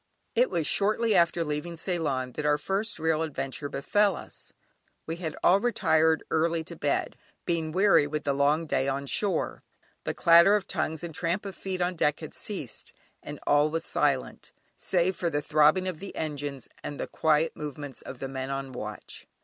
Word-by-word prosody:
It 245 Hz, +2 st, +3 dB
was 170 Hz, -4 st, -1 dB
shortly 215 Hz, +5 st, +2 dB
after 170 Hz, -2 st, +3 dB
leaving 150 Hz, +2 st, -4 dB
Ceylon 150 Hz, -8 st, -2 dB
that 150 Hz, -, -5 dB
our 150 Hz, 0 st, +3 dB
first 195 Hz, +8 st, -1 dB
real 160 Hz, -1 st, +1 dB
adventure 145 Hz, -2 st, -3 dB
befell 200 Hz, +9 st, +2 dB
us. -, -, -9 dB, 0.5 s
We 165 Hz, +1 st, -4 dB
had 160 Hz, -3 st, -4 dB
all 190 Hz, +3 st, +6 dB
retired 160 Hz, -8 st, +2 dB
early 165 Hz, +1 st, +1 dB
to 170 Hz, +1 st, -9 dB
bed, 145 Hz, -3 st, -1 dB, 0.3 s
being 165 Hz, -2 st, -1 dB
weary 190 Hz, -4 st, +4 dB
with 150 Hz, +1 st, -3 dB
the 140 Hz, -, +1 dB
long 145 Hz, +4 st, +2 dB
day 135 Hz, -3 st, 0 dB
on 140 Hz, +1 st, -1 dB
shore; 190 Hz, +4 st, -1 dB, 0.4 s
the -, -, -3 dB
clatter 170 Hz, +4 st, +7 dB
of 205 Hz, -2 st, 0 dB
tongues 160 Hz, +2 st, -2 dB
and 170 Hz, -2 st, -5 dB
tramp 170 Hz, +5 st, -1 dB
of 195 Hz, -1 st, -6 dB
feet 185 Hz, -1 st, -4 dB
on 175 Hz, +1 st, +1 dB
deck 150 Hz, -2 st, +1 dB
had 155 Hz, -, -7 dB
ceased, 150 Hz, -, -6 dB, 0.3 s
and -, -, -8 dB
all 145 Hz, +1 st, +4 dB
was 165 Hz, +2 st, -2 dB
silent 140 Hz, -3 st, -1 dB, 0.2 s
save 185 Hz, 0 st, +1 dB
for 170 Hz, -, -1 dB
the 145 Hz, -2 st, 0 dB
throbbing 155 Hz, +5 st, +3 dB
of 180 Hz, -4 st, -4 dB
the 195 Hz, +1 st, -8 dB
engines, 145 Hz, -4 st, -4 dB, 0.2 s
and 145 Hz, -, -6 dB
the -, -, -1 dB
quiet 160 Hz, 0 st, +1 dB
movements 145 Hz, -2 st, -7 dB
of 130 Hz, -, -8 dB
the 135 Hz, -, -4 dB
men 130 Hz, 0 st, -4 dB
on 135 Hz, -1 st, -4 dB
watch. 105 Hz, -4 st, -7 dB
160 Hz, 185 wpm, -28 LUFS, 145-175 Hz, 0.5 s, clatter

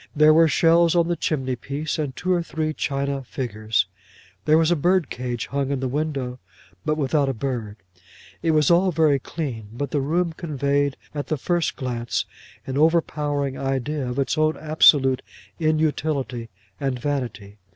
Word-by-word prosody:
There 155 Hz, +1 st, +6 dB
were 165 Hz, +1 st, +6 dB
shells 165 Hz, +1 st, +4 dB
on 170 Hz, 0 st, +3 dB
the 175 Hz, -, +1 dB
chimneypiece, 140 Hz, 0 st, -2 dB
and 140 Hz, -4 st, -2 dB
two 185 Hz, +1 st, 0 dB
or 175 Hz, -, +2 dB
three 160 Hz, -2 st, -2 dB
china 140 Hz, -1 st, -2 dB
figures. 110 Hz, -4 st, -1 dB, 0.6 s
There 155 Hz, +1 st, +5 dB
was 165 Hz, +1 st, +3 dB
a -, -, +4 dB
birdcage 135 Hz, -, 0 dB
hung 140 Hz, -1 st, -2 dB
in 140 Hz, -2 st, -1 dB
the 130 Hz, -, -1 dB
window 135 Hz, -3 st, -2 dB, 0.4 s
but 155 Hz, 0 st, 0 dB
without 140 Hz, -1 st, +1 dB
a 135 Hz, -, -2 dB
bird. 115 Hz, -4 st, -3 dB, 0.7 s
It 165 Hz, -, 0 dB
was 155 Hz, 0 st, +4 dB
all 180 Hz, +2 st, +4 dB
very 155 Hz, -4 st, +3 dB
clean, 130 Hz, -8 st, -5 dB
but 135 Hz, +4 st, -4 dB
the 145 Hz, -, +1 dB
room 165 Hz, +4 st, 0 dB
conveyed 140 Hz, -3 st, -1 dB, 0.2 s
at 145 Hz, -1 st, -4 dB
the 155 Hz, -, -1 dB
first 175 Hz, +4 st, 0 dB
glance 120 Hz, -3 st, -2 dB, 0.4 s
an 135 Hz, +1 st, -2 dB
overpowering 150 Hz, -4 st, +1 dB
idea 135 Hz, 0 st, -2 dB
of 125 Hz, -, -4 dB
its 140 Hz, +3 st, 0 dB
own 155 Hz, 0 st, +2 dB
absolute 145 Hz, -4 st, +4 dB, 0.4 s
inutility 155 Hz, -6 st, 0 dB, 0.3 s
and 135 Hz, -2 st, -1 dB
vanity. 120 Hz, -7 st, -4 dB
145 Hz, 160 wpm, -23 LUFS, 130-155 Hz, 0.7 s, There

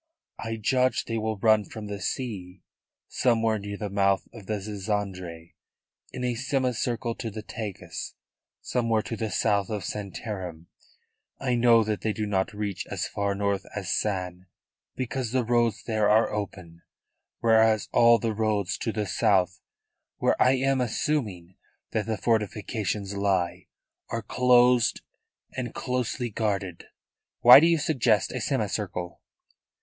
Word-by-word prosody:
I 115 Hz, 0 st, -3 dB
judge 130 Hz, +4 st, +1 dB
they 115 Hz, -1 st, -2 dB
will 110 Hz, 0 st, -2 dB
run 110 Hz, +1 st, +4 dB
from 110 Hz, -1 st, -8 dB
the 100 Hz, -1 st, -6 dB
sea, 95 Hz, -4 st, -4 dB, 0.4 s
somewhere 115 Hz, -3 st, +1 dB
near 100 Hz, 0 st, -6 dB
the 105 Hz, -, -3 dB
mouth 100 Hz, -1 st, +2 dB
of 105 Hz, -5 st, -12 dB
the 105 Hz, -1 st, -1 dB
Zizandre, 95 Hz, -5 st, -4 dB, 0.6 s
in 125 Hz, -, -5 dB
a 125 Hz, -1 st, 0 dB
semicircle 125 Hz, -2 st, -1 dB
to 115 Hz, 0 st, -5 dB
the 110 Hz, 0 st, -7 dB
Tagus, 110 Hz, -6 st, -6 dB, 0.5 s
somewhere 115 Hz, -3 st, 0 dB
to 115 Hz, -, -4 dB
the 110 Hz, 0 st, -3 dB
south 100 Hz, 0 st, +1 dB
of 105 Hz, -3 st, -3 dB
Santarem. 95 Hz, -5 st, -5 dB, 0.7 s
I 130 Hz, -2 st, 0 dB
know 120 Hz, -1 st, +5 dB
that 105 Hz, -1 st, -2 dB
they 110 Hz, -, 0 dB
do 105 Hz, +2 st, -2 dB
not 95 Hz, -2 st, 0 dB
reach 105 Hz, -2 st, -4 dB
as -, -, -3 dB
far 100 Hz, -1 st, -1 dB
north 100 Hz, -1 st, 0 dB
as 95 Hz, -3 st, -1 dB
San, 90 Hz, -3 st, -3 dB, 0.5 s
because 130 Hz, -1 st, -3 dB
the 130 Hz, -1 st, +2 dB
roads 115 Hz, -2 st, +1 dB
there 110 Hz, -2 st, +1 dB
are 110 Hz, +2 st, +4 dB
open, 90 Hz, -5 st, -6 dB, 0.6 s
whereas 110 Hz, -2 st, +4 dB
all 115 Hz, 0 st, +6 dB
roads 110 Hz, -4 st, -1 dB
to 115 Hz, -, -1 dB
the 105 Hz, -1 st, -2 dB
south, 95 Hz, -2 st, +1 dB, 0.6 s
where -, -, +2 dB
I 130 Hz, -, +6 dB
am 135 Hz, 0 st, +1 dB
assuming 110 Hz, -, -2 dB, 0.3 s
that 110 Hz, -1 st, -1 dB
the 110 Hz, -1 st, -1 dB
fortifications 105 Hz, -2 st, -1 dB
lie, 95 Hz, -3 st, 0 dB, 0.4 s
are 115 Hz, -1 st, -3 dB
closed 125 Hz, +1 st, +4 dB, 0.5 s
and 125 Hz, -3 st, -4 dB
closely 125 Hz, -1 st, -2 dB
guarded." 100 Hz, -5 st, -2 dB, 0.6 s
"Why 125 Hz, +3 st, +11 dB
do 165 Hz, -, +4 dB
you 170 Hz, -1 st, +4 dB
suggest 125 Hz, -, +1 dB
a -, -, -4 dB
semicircle?" 90 Hz, -1 st, -2 dB
110 Hz, 140 wpm, -26 LUFS, 100-120 Hz, 0.7 s, Why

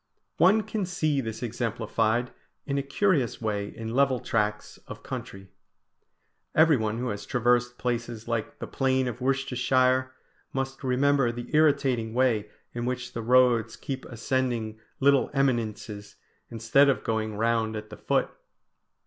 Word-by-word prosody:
One 195 Hz, +6 st, +5 dB
can 205 Hz, -4 st, -3 dB
see 155 Hz, -6 st, 0 dB
this 110 Hz, -1 st, -6 dB
exemplified 115 Hz, 0 st, -1 dB, 0.3 s
in 140 Hz, -1 st, -1 dB
a -, -, 0 dB
curious 140 Hz, -, +1 dB
way 105 Hz, -3 st, -2 dB
in 115 Hz, +2 st, -7 dB
level 135 Hz, -1 st, +3 dB
tracts 105 Hz, -2 st, -2 dB
of -, -, -9 dB
country. 95 Hz, 0 st, -7 dB, 1.1 s
Everyone 130 Hz, -9 st, +3 dB
who 125 Hz, +1 st, -2 dB
has 105 Hz, -1 st, -4 dB
traversed 120 Hz, +2 st, +1 dB
places 120 Hz, -2 st, -3 dB
like 115 Hz, -2 st, -3 dB
the -, -, -5 dB
plain 130 Hz, -1 st, 0 dB
of 120 Hz, +1 st, -5 dB
Worcestershire 130 Hz, -1 st, +1 dB, 0.4 s
must 135 Hz, 0 st, -3 dB
remember 135 Hz, 0 st, +2 dB
the 120 Hz, +1 st, -8 dB
irritating 130 Hz, -7 st, +2 dB
way 115 Hz, -5 st, +2 dB, 0.2 s
in 120 Hz, 0 st, -3 dB
which 125 Hz, -1 st, -4 dB
the 115 Hz, -, -4 dB
roads 120 Hz, -2 st, +3 dB
keep 135 Hz, -2 st, -6 dB
ascending 115 Hz, -2 st, -2 dB, 0.2 s
little 140 Hz, 0 st, +4 dB
eminences, 110 Hz, -6 st, -1 dB, 0.3 s
instead 115 Hz, +5 st, +3 dB
of 135 Hz, -, 0 dB
going 110 Hz, -1 st, -2 dB
round 110 Hz, 0 st, 0 dB
at 105 Hz, 0 st, -7 dB
the 105 Hz, -, -8 dB
foot. -, -, 0 dB
120 Hz, 140 wpm, -27 LUFS, 110-135 Hz, 1.1 s, One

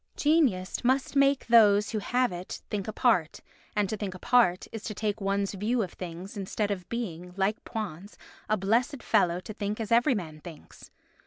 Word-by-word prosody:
Genius 275 Hz, -, +2 dB
must 260 Hz, +3 st, +1 dB
make 275 Hz, 0 st, +3 dB
those 210 Hz, -3 st, +5 dB
that 215 Hz, -2 st, -2 dB
have 250 Hz, 0 st, +1 dB
it 180 Hz, +1 st, -6 dB
think 200 Hz, -2 st, -2 dB
apart, 215 Hz, -7 st, +1 dB, 0.4 s
and 205 Hz, -1 st, +2 dB
to 215 Hz, -, -3 dB
think 195 Hz, -3 st, -5 dB
apart 185 Hz, -2 st, +3 dB
is 225 Hz, -2 st, -7 dB
to 215 Hz, -, -5 dB
take 210 Hz, 0 st, -2 dB
one's 195 Hz, 0 st, 0 dB
view 220 Hz, +4 st, 0 dB
of 180 Hz, -, -7 dB
things 180 Hz, +3 st, -8 dB
instead 205 Hz, +1 st, -2 dB
of 185 Hz, -3 st, -5 dB
being, 180 Hz, -7 st, -5 dB
like 195 Hz, +3 st, 0 dB
Poins, 205 Hz, -3 st, -6 dB, 0.3 s
a 215 Hz, -, +2 dB
blessed 240 Hz, +8 st, 0 dB
fellow 180 Hz, -5 st, +2 dB
to 215 Hz, -, -8 dB
think 210 Hz, 0 st, -3 dB
as 220 Hz, -1 st, -4 dB
every 240 Hz, +3 st, +4 dB
man 160 Hz, -6 st, -6 dB
thinks. 160 Hz, -1 st, -12 dB
210 Hz, 180 wpm, -28 LUFS, 185-235 Hz, 0.4 s, those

